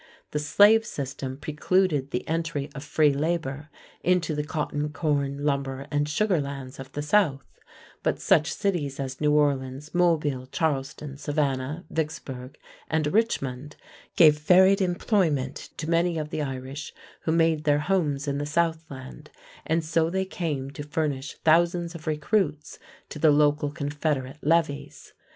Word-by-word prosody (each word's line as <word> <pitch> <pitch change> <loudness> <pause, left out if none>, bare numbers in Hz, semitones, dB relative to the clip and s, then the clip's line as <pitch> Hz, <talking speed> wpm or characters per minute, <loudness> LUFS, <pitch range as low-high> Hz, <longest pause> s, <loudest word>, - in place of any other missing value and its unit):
The 150 - -1
slave 205 +9 +5
system 135 -6 -5
precluded 155 -1 +1
the 125 - -3
entry 160 -3 -2
of 135 - -7
free 150 -1 +3
labor 150 -1 -2 0.3
into 180 -2 +2
the 150 0 -1
cotton, 150 -1 -2
corn, 145 -2 -1
lumber, 140 -1 -1
and 145 0 0
sugar 180 +1 +1
lands 135 -2 -7
of 135 0 -9
the 145 - -3
South, 150 -5 +2 0.6
but - - 0
such 155 +1 +3
cities 155 -9 -2
as 130 0 -5
New 150 -1 +3
Orleans, 140 -1 0
Mobile, 155 -7 +1
Charleston, 140 -1 -2
Savannah, 145 +1 -2
Vicksburg, 135 -5 -4 0.3
and 155 -1 0
Richmond 145 - -1 0.4
gave 150 -3 +6
varied 190 +5 +5
employment 175 - 0
to 155 - -4
many 170 0 +2
of 150 -1 -4
the 155 - -2
Irish 135 +1 -5 0.3
who 160 - +1
made 165 -2 +2
their 145 -1 +4
homes 150 -5 0
in 140 0 -1
the 145 - -2
Southland, 155 -3 -3 0.4
and 160 0 +1
so 165 0 +1
they 190 +2 -1
came 150 -8 -3
to 145 - -7
furnish 145 -2 -2
thousands 170 +1 +3
of 165 -2 -10
recruits 150 0 -1 0.3
to 150 - -7
the 155 +1 +5
local 145 0 +3
Confederate 145 -1 -2
levies. 155 -2 -1
150 Hz, 145 wpm, -26 LUFS, 140-165 Hz, 0.6 s, gave